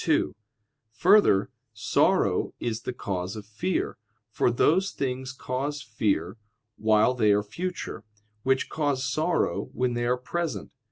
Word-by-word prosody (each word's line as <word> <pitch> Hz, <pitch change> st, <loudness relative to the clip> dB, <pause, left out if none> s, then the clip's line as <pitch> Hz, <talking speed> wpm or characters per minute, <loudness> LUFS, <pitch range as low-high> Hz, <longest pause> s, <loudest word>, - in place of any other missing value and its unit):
2: -, -, +1 dB, 0.6 s
Further, 180 Hz, -, +4 dB, 0.2 s
sorrow -, -, +2 dB
is 115 Hz, -1 st, -2 dB
the -, -, -3 dB
cause 95 Hz, -5 st, -4 dB
of 105 Hz, -2 st, -7 dB
fear, 110 Hz, -, -2 dB, 0.3 s
for -, -, +2 dB
those 170 Hz, +10 st, +3 dB
things 130 Hz, -3 st, -3 dB
cause 140 Hz, +3 st, -3 dB
fear 110 Hz, -2 st, -1 dB, 0.4 s
while 110 Hz, +3 st, +3 dB
they 110 Hz, -4 st, +3 dB
are 100 Hz, 0 st, +3 dB
future, 170 Hz, -, -5 dB, 0.4 s
which 130 Hz, +2 st, +1 dB
cause 145 Hz, -4 st, -1 dB
sorrow 155 Hz, +6 st, 0 dB
when 125 Hz, -1 st, 0 dB
they 120 Hz, 0 st, -1 dB
are 125 Hz, +1 st, +2 dB
present. 165 Hz, +6 st, -3 dB
125 Hz, 130 wpm, -27 LUFS, 110-145 Hz, 0.6 s, Further